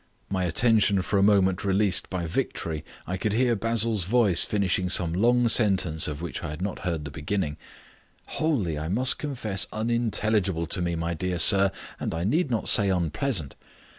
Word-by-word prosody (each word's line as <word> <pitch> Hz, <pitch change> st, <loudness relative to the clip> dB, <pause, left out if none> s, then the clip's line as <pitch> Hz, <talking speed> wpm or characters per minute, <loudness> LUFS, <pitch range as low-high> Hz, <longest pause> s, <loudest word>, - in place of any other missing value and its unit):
My 95 Hz, -2 st, -1 dB
attention 105 Hz, 0 st, +2 dB
for 100 Hz, +2 st, 0 dB
a -, -, +3 dB
moment 95 Hz, -3 st, +2 dB
released 100 Hz, -1 st, +1 dB
by 90 Hz, -2 st, -3 dB
victory, 80 Hz, -1 st, -3 dB, 0.2 s
I 90 Hz, -, -4 dB
could 105 Hz, +2 st, -2 dB
hear 120 Hz, +1 st, +2 dB
Basil's 115 Hz, -2 st, 0 dB
voice 105 Hz, -4 st, +3 dB
finishing 95 Hz, -3 st, 0 dB
some 85 Hz, -2 st, +2 dB
long 120 Hz, +6 st, +2 dB
sentence 95 Hz, -8 st, +3 dB
of 75 Hz, +2 st, -6 dB
which 85 Hz, -, -5 dB
I 85 Hz, -, -4 dB
had 75 Hz, +1 st, -7 dB
not 95 Hz, +1 st, -4 dB
heard 85 Hz, -4 st, -3 dB
the 70 Hz, -, -7 dB
beginning. 75 Hz, +1 st, -3 dB, 0.4 s
"... -, -, -35 dB
wholly, 105 Hz, -, -1 dB
I 80 Hz, -, -4 dB
must 125 Hz, +7 st, 0 dB
confess, 110 Hz, -10 st, -1 dB
unintelligible 110 Hz, -5 st, 0 dB
to 90 Hz, -, -3 dB
me, 85 Hz, -1 st, -1 dB
my 85 Hz, +1 st, -3 dB
dear 90 Hz, +2 st, -3 dB
sir, 95 Hz, +4 st, +5 dB, 0.3 s
and -, -, -3 dB
I 85 Hz, -, -3 dB
need 145 Hz, -, 0 dB
not 115 Hz, -3 st, -2 dB
say 100 Hz, -2 st, +5 dB
unpleasant. 90 Hz, -, -2 dB
95 Hz, 180 wpm, -25 LUFS, 85-110 Hz, 0.4 s, sir